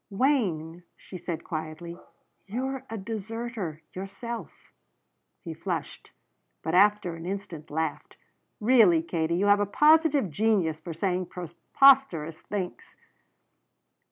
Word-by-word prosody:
"Wayne," 195 - 0 0.2
she 185 - -10
said 170 -1 -5
quietly, 160 +2 -6 0.5
"you're 260 +5 -3
a 225 - -4
deserter, 215 -5 -5
yourself." 195 +5 -7 0.7
He - - -5
flushed, - - -5 0.5
but 160 - -2
after 200 -1 +4
an 165 +1 -8
instant 185 -5 -6
laughed. 160 -1 -3 0.4
"Really, 210 -8 +5
Katie, 165 0 -1
you 195 - +1
have 205 0 +5
a 205 - +1
positive 300 - +4
genius 180 -4 +1
for 165 0 -7
saying 180 +1 -1
preposterous 180 - +3
things." 190 -4 -5
190 Hz, 110 wpm, -27 LUFS, 165-225 Hz, 0.7 s, Really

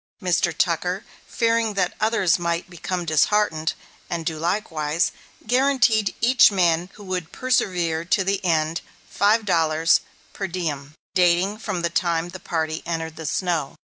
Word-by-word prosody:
Mr. 180 -3 +1
Tucker, 180 +4 -1 0.2
fearing 230 -2 +1
that 185 -2 0
others 215 -6 +2
might 170 +1 -2
become 175 0 -4
disheartened 160 0 +1 0.3
and 170 -1 -3
do 160 -1 -2
likewise, 165 -3 0 0.3
guaranteed 245 -5 +2
each 245 -1 +6
man 175 -2 +1
who 210 - -12
would 180 -3 -4
persevere 175 -10 0
to 185 +3 +1
the 195 +1 -1
end, 160 -2 +1 0.3
five 210 +3 +2
dollars 165 -3 +3 0.3
per 195 - -3
diem, 155 -5 -4 0.2
dating 180 +3 +2
from 195 -6 -3
the 170 - 0
time 170 0 0
the 185 - -9
party 160 -2 -2
entered 165 -1 -4
the 160 -2 -6
snow. 170 -4 -1
175 Hz, 140 wpm, -23 LUFS, 165-200 Hz, 0.3 s, each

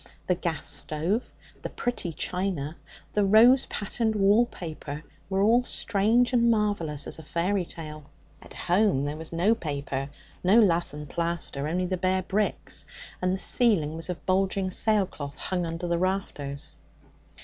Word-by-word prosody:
The 180 - +2
gas 170 -4 -3
stove, 170 +10 -1 0.3
the - - -4
pretty 240 -8 -3
china, 170 -3 -3 0.4
the 210 - +2
rose 230 +6 +6
patterned 220 +2 -1
wall 205 +4 +4
paper, 155 -6 -7 0.3
were 190 0 +1
all 235 +4 +5
strange 230 +2 +2
and 235 -1 +4
marvellous 205 -10 0
as - - -4
a - - -7
fairy 175 +4 -1
tale. 155 -3 -8 0.3
At - - -11
home 180 -6 +2
there 145 +1 -3
was 160 +1 -7
no 175 +7 +3
paper, 140 -7 -3 0.3
no 195 +6 +6
lath 175 -7 +2
and 150 0 -7
plaster, 170 -4 -2
only 180 +3 0
the 185 +1 -1
bare 185 +1 +1
bricks, 205 +3 -1 0.4
and 185 0 +1
the 190 - 0
ceiling 190 - +3
was 165 +2 -3
of 180 - -5
bulging 190 0 +1
sailcloth 185 -9 0
hung 180 -2 -2
under 165 +2 -4
the 170 -1 0
rafters. 170 -7 -3
185 Hz, 155 wpm, -27 LUFS, 160-205 Hz, 0.4 s, rose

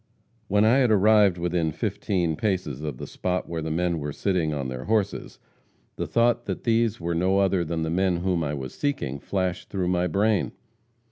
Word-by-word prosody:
"When 105 +2 +3
I 115 +4 +5
had 125 -3 +3
arrived 105 -2 +5
within 85 -2 0
fifteen 85 +1 -1
paces 90 - -2
of 75 -5 -4
the - - -6
spot 90 0 -3
where 85 -1 -4
the 80 - -3
men 85 +1 0
were 75 0 -4
sitting 90 -1 0
on 70 -3 -3
their 65 0 -6
horses, 105 -2 -1 0.6
the - - -3
thought 120 0 +2
that - - -4
these 115 -2 +1
were 85 0 -2
no 95 +3 +2
other 95 -2 +2
than 80 0 -2
the 80 - -2
men 90 0 +1
whom 90 -3 0
I 75 0 -2
was 65 -2 -6
seeking, 70 - -2
flashed 95 +2 -2
through 95 -3 -1
my 90 0 +1
brain. 100 +3 +1
90 Hz, 195 wpm, -25 LUFS, 80-100 Hz, 0.6 s, I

